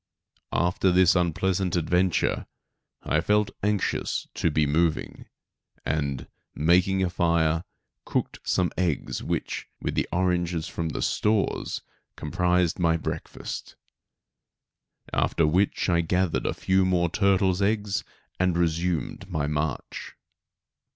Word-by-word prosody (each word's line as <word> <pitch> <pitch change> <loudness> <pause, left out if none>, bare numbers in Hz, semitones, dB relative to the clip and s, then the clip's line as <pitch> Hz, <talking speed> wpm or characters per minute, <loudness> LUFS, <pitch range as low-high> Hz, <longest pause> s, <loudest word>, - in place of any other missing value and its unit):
After 90 +2 +2
this 90 0 +5
unpleasant 90 +1 +1
adventure 90 +2 +1 0.6
I 80 - +1
felt 105 +3 +2
anxious 105 -1 -1
to - - +1
be 75 0 +2
moving, 80 +2 0 0.6
and, 70 -3 -1 0.3
making 90 +4 +3
a 90 - +1
fire, 85 -1 +2 0.4
cooked - - -2
some 90 -2 +1
eggs 85 -6 -1
which, - - -3
with - - 0
oranges 90 -2 0
from 80 -1 -3
the - - -3
stores, 105 -1 0 0.3
comprised 90 -1 +1
my 85 -1 +3
breakfast; 80 0 -6 1.4
after 85 - +2
which 90 +6 +1
I 85 -2 +3
gathered 90 +1 0
a - - 0
few 95 0 +2
more 90 -2 +2
turtles' 95 -1 +2
eggs, 105 -1 0 0.4
and 90 -1 +2
resumed 85 +2 -1
my 80 -5 -1
march. 75 -1 -3
90 Hz, 110 wpm, -26 LUFS, 80-95 Hz, 1.4 s, this